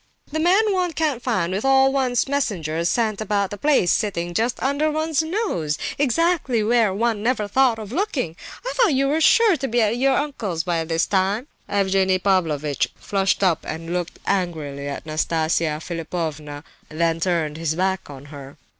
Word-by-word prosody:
"The 315 - -2
man 390 +6 +3
one 360 -3 0
can't 300 -6 -1
find 185 -9 -1
with 195 - -2
all 270 0 +4
one's 255 -3 +1
messengers 175 - -1
sent 220 -3 0
about 200 -2 0
the 205 - -5
place, 280 - +3
sitting 175 -4 -1
just 230 +6 0
under 280 +3 +1
one's 310 0 0
nose, 315 - -2 0.2
exactly 285 -4 +1
where 225 -2 +3
one 220 +2 0
never 225 -2 0
thought 250 +2 +3
of 215 -2 -8
looking! 280 - -2 0.3
I - - -2
thought 445 - +3
you 275 +1 +2
were 305 +3 +1
sure 440 +3 +5
to 270 - -3
be 240 0 0
at 220 +1 +2
your 265 +1 +3
uncle's 220 - -2
by 170 -1 -1
this 165 +1 +1
time." 200 +5 0 0.2
Evgenie 190 -1 +2
Pavlovitch 160 -7 0
flushed 195 0 0
up 175 -4 +2
and 165 +2 -5
looked 175 -1 -3
angrily 155 -7 -2
at 140 - -6
Nastasia 155 0 0
Philipovna, 155 -3 -5 0.3
then 165 +1 0
turned 165 -3 -1
his 160 -1 -1
back 190 0 -1
on 140 -1 -10
her. 140 0 -10
200 Hz, 170 wpm, -22 LUFS, 165-270 Hz, 0.3 s, sure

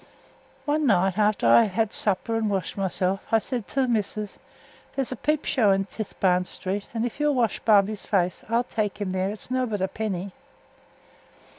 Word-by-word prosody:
One 300 0 +1
night 195 -2 +2
after 210 - +2
I 115 0 +7
had 205 - -4
had 220 +1 0
supper 210 +3 0
and 225 -1 0
washed 190 -4 -2
myself, 190 0 -1
I 225 - +6
said 225 -1 -3
to 270 +4 0
th' - - -4
missus, 215 -2 -2 0.6
'There's 270 -2 -1
a - - -2
peep 300 +4 -1
show 225 -6 +3
i' 195 - +4
Tithebarn 195 -2 0
Street, 195 +2 -4
and 230 0 -1
if 245 - -5
you'll 295 -1 +2
wash 235 -4 +1
Bobby's 210 -1 +3
face 180 -3 0
I'll 230 +1 +2
tek 215 -4 -3
him 200 -3 -2
there; 190 +1 0
its 215 +4 -7
nobbut 250 -5 0
a 190 - +1
penny.' 195 -2 -4
210 Hz, 185 wpm, -25 LUFS, 195-230 Hz, 0.6 s, I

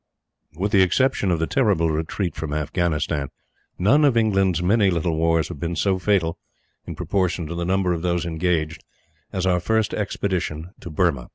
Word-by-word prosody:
With 100 +5 -2
the 100 -3 +5
exception 100 +2 +2
of 85 - +2
the 80 - 0
terrible 80 +2 +2
retreat 80 +4 -2
from 75 -2 -4
Afghanistan, 75 -1 -1 0.5
none 130 +12 +4
of 135 -5 +4
England's 95 -6 +2
many 100 +2 +3
little 85 -2 0
wars 80 0 +1
have 75 - -7
been 85 +2 -3
so 95 +4 +1
fatal 90 -4 +1 0.5
in - - -5
proportion 90 -3 -1
to 80 - -5
the 85 0 -3
number 95 0 +1
of 85 - -3
those 85 -1 0
engaged 80 -2 -1 0.5
as 95 -1 -2
our 90 -1 +2
first 110 +4 0
expedition 90 -5 -2
to - - -8
Burma. 75 -6 0
90 Hz, 175 wpm, -23 LUFS, 80-95 Hz, 0.5 s, the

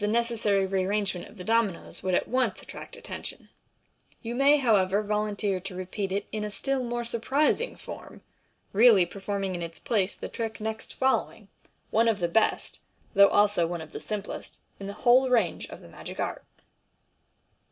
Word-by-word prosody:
necessary 215 -3 +2
rearrangement 190 -1 -1
of - - -16
the 180 - -7
dominoes 225 -3 0
would 185 -1 +1
at - - +1
once 255 +1 +1
attract - - -10
atten 485 +1 -6
tion, - - -6 0.7
You 230 0 -3
may, 275 +4 +5
however, 210 -6 +3
volunteer 210 -2 -1
to 190 0 -8
repeat 185 +2 -4
it 200 +1 -1
in 215 -1 -3
a 210 - -2
still 270 +5 -1
more 240 0 -2
sur 235 0 -3
prising 300 - +1
form, - - -10 0.5
really 210 -3 +7
performing 195 +1 -3
in 175 - -4
its 165 0 -5
place 205 -5 0
the - - -5
trick 225 -1 -4
next 220 +1 -5
following, 265 0 0 0.4
one 230 +2 +4
of 225 -3 +3
the 175 -3 0
best, 220 +6 +1 0.3
though 200 -1 +8
also 205 -5 +3
one 175 0 -3
of 160 -1 -9
the - - -6
simplest, 210 -1 -6 0.2
in 195 - -6
the 200 - -5
whole 255 +2 +6
range 225 -9 +1
of - - -10
the - - -13
magic - - -9
art. - - -3
210 Hz, 175 wpm, -27 LUFS, 190-235 Hz, 0.7 s, though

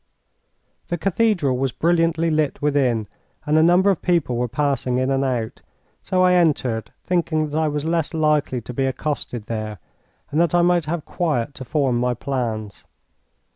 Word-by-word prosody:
The 175 - -2
cathedral 180 - +1
was 135 -1 0
brilliantly 165 +2 +1
lit 155 -2 0
within, 130 -7 +1 0.4
and 150 0 +1
a 155 - +6
number 180 +4 +5
of 185 - -2
people 170 -8 +1
were 125 +1 0
passing 130 -1 -1
in 130 +1 0
and 135 0 +1
out; 120 -4 -2 0.4
so 185 -1 +1
I 180 0 +5
entered, 140 -10 +1
thinking 160 -4 0
that 150 - -2
I 160 - +2
was 150 0 -2
less 165 -1 0
likely 150 -5 +1
to 125 - -8
be 135 +2 0
accosted 130 -4 -3
there, 110 -2 -4 0.5
and 155 +3 +2
that 170 0 +2
I 175 - +4
might 175 -2 +2
have 160 0 -3
quiet 145 -7 -1
to 130 - -8
form 135 -3 +1
my 125 0 0
plans. 110 -8 -4
145 Hz, 175 wpm, -22 LUFS, 125-165 Hz, 0.5 s, a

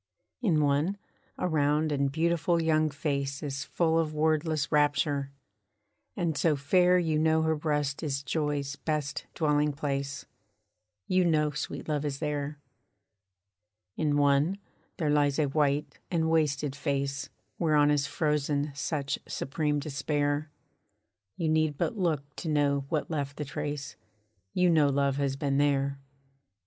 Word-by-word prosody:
In 170 -10 +3
one, 145 +7 +1 0.4
a - - 0
round 150 -1 +2
and 140 -1 +1
beautiful 170 +2 +1
young 155 -1 +2
face 140 -1 -2
Is 140 -1 -3
full 165 -1 +1
of 155 -2 -1
wordless 155 -1 +1
rapture; 145 -1 +2 0.9
and 170 -4 0
so 155 +1 +2
fair 180 +6 +4
You 160 -3 +1
know 160 0 +3
her 160 0 +2
breast 150 -2 -1
is 140 -3 -2
joy's 145 -1 -1
best 150 -2 -3
dwelling 150 -2 +2
place; 140 -2 -3 0.8
You 185 0 +2
know 155 -3 +2
sweet 145 +1 -5
love 150 -2 -1
is 145 -2 -2
there. 150 -1 -3 1.4
In 150 -2 +1
one, 145 +6 +3 0.4
there 155 -4 0
lies 145 -1 +2
a 155 - +3
white 145 +1 0
and 160 -2 +1
wasted 150 -3 +1
face 140 -1 -2 0.3
Whereon 150 -3 +4
is 145 -1 +1
frozen 150 -1 0
such 145 0 -2
supreme 150 +1 -1
despair, 145 +1 -1 0.9
You 165 - -1
need 155 -2 +2
but - - -1
look 150 -7 -1
to 165 - -4
know 140 -2 +1
what 155 0 -1
left 145 -2 -3
the 150 - -3
trace; 145 0 -5 0.5
You 180 0 +2
know 155 -3 +5
love 140 0 +1
has 140 -1 0
been 140 -1 0
there. 140 -1 +1
150 Hz, 140 wpm, -29 LUFS, 140-155 Hz, 1.4 s, know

